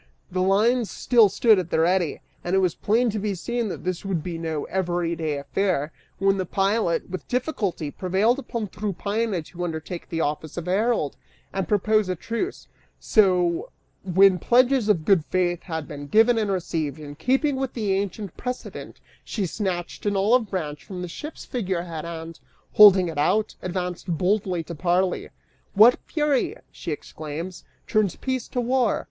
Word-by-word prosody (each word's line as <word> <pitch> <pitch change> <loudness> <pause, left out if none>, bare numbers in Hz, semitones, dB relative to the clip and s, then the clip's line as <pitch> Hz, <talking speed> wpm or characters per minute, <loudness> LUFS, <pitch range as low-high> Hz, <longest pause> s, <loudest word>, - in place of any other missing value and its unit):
The 185 0 0
lines 215 +5 +3
still 230 -4 +4
stood 215 +1 +4
at 175 -2 -4
the - - +1
ready, 175 -2 +1 0.2
and 175 +2 0
it - - +4
was 185 -3 +2
plain 230 +3 +1
to 215 - -3
be 205 -1 -2
seen 235 +5 -2
that - - -6
this 180 -1 -3
would 185 -6 -2
be 170 -2 -4
no 160 -3 -2
everyday 170 -4 -1
affair, 150 +1 -1 0.3
when 195 0 +2
the 185 - -1
pilot, 195 -3 0
with 185 -4 -6
difficulty, 210 - -2
prevailed 195 - +1
upon 235 -5 -4
Tryphaena 205 -1 -2
to 175 +3 -7
undertake 165 +1 -5
the 165 - -3
office 155 +1 -2
of 175 - -4
herald, 195 -4 0 0.4
and 195 -1 -2
propose 210 0 +2
a 185 - 0
truce; 230 - -4 0.3
so, 180 -5 +2 0.3
when 190 0 +5
pledges 250 - +3
of 170 -7 +2
good 190 -6 +4
faith 175 -2 0
had 160 -4 -5
been 145 -1 -7
given 225 - +4
and 210 -2 0
received, 160 -6 -2
in 150 -2 -8
keeping 270 - +1
with 265 -1 -3
the 210 -5 0
ancient 200 -1 -3
precedent 250 0 -6 0.2
she 205 -4 -2
snatched 185 0 -3
an 205 - +1
olive 220 +3 +3
branch 150 -6 -4
from 180 -2 -7
the - - -4
ship's 300 - -8
figurehead 180 - -3
and, 165 -1 -7 0.3
holding 195 -3 +8
it 160 -3 -4
out, 210 +8 +2
advanced 180 0 -4
boldly 185 -2 0
to 170 - -7
parley. 180 +3 0 0.5
"What 225 +5 +7
fury," 295 -4 +1 0.2
she - - -6
exclaims, 155 +4 -6 0.2
"turns 215 -5 +1
peace 260 -2 -3
to 245 - -2
war? 245 -1 +2
190 Hz, 165 wpm, -24 LUFS, 170-220 Hz, 0.5 s, holding